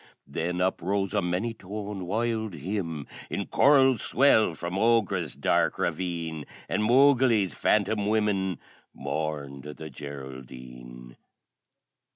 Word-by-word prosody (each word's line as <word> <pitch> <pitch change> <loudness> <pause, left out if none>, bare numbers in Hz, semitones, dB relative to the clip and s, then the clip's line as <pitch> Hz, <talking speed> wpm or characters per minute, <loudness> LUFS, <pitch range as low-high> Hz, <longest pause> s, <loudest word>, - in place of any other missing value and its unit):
Then 90 +2 -3
uprose 95 +2 0
a 105 - +2
many 90 +6 -1
toned 100 -2 -6
wild 110 -1 -1
hymn 80 -2 -4 0.2
in - - -3
Choral 135 -4 +4
swell 110 -10 +3
from 85 +1 -5
Ogra's 100 - +1
dark - - +1
ravine, 85 -4 -3 0.2
And - - -1
Mogeely's 120 - +4
Phantom 105 0 +1
Women 105 -4 +1 0.4
Mourned 70 -3 -4
the 75 +2 -9
Geraldine! 65 -3 -10
95 Hz, 105 wpm, -27 LUFS, 75-110 Hz, 0.4 s, Choral